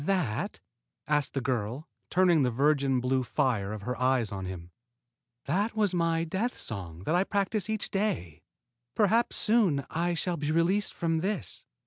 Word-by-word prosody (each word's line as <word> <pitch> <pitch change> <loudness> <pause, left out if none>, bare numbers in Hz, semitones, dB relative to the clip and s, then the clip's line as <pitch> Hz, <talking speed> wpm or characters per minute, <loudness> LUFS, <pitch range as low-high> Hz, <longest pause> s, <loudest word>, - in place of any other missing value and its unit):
"That?" 160 - -1 0.5
asked 150 -2 0
the 135 - 0
girl, 125 +4 -2 0.2
turning 175 -4 +4
the 130 - +3
virgin 135 0 +2
blue 130 +1 +1
fire 110 -5 0
of 105 -1 -6
her 125 +3 -2
eyes 125 -4 +2
on 95 -2 -4
him. 90 -2 -7 0.7
"That 200 +10 0
was 210 -4 +2
my 165 -1 +1
death 190 +9 -2
song 90 -6 -6
that 155 - 0
I 180 +2 +4
practice 200 0 -1
each 220 -1 -2
day. 195 - -2 0.5
Perhaps 225 +3 +3
soon 200 - +2
I 170 +1 0
shall 175 +1 -1
be 150 +1 -1
released 180 +5 +1
from 165 -1 0
this." 200 +5 -2
155 Hz, 160 wpm, -29 LUFS, 125-190 Hz, 0.7 s, turning